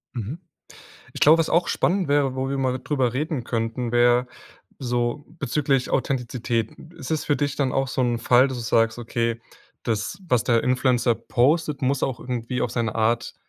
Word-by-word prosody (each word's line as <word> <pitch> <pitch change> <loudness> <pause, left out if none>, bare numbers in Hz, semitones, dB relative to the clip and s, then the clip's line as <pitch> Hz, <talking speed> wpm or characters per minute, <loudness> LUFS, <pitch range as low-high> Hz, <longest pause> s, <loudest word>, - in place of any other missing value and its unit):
Mhm. 120 - -5 0.7
Ich - - -8
glaube, 160 +3 +7
was 165 - +1
auch 170 +1 +2
spannend 180 -3 +1
wäre, 140 -2 +2
wo 130 0 -1
wir 140 - -2
mal 130 -1 0
drüber 130 -5 0
reden 145 -2 -2
könnten, 115 +1 -2
wäre 120 +1 +4 0.5
so 120 +2 -1
bezüglich 135 0 0
Authentizität. 125 -3 -1 0.3
Ist 140 -4 -8
es 160 0 -1
für 145 - +1
dich 145 -2 -1
dann 135 -3 0
auch 135 0 0
so 130 - -2
'n 120 -1 0
Fall, 125 +3 +4
dass 130 -2 -5
du - - -4
sagst, 115 0 +2
okay, 115 0 -2 0.4
das, 115 - -2
was 125 -4 +2
der 115 -2 +2
Influencer 125 -2 +2
postet, 145 +4 +1
muss 135 +1 0
auch 125 -3 -1
irgendwie 125 0 -3
auf 120 - -1
seine 115 -2 -2
Art 115 +1 0
125 Hz, 180 wpm, -24 LUFS, 120-140 Hz, 0.7 s, glaube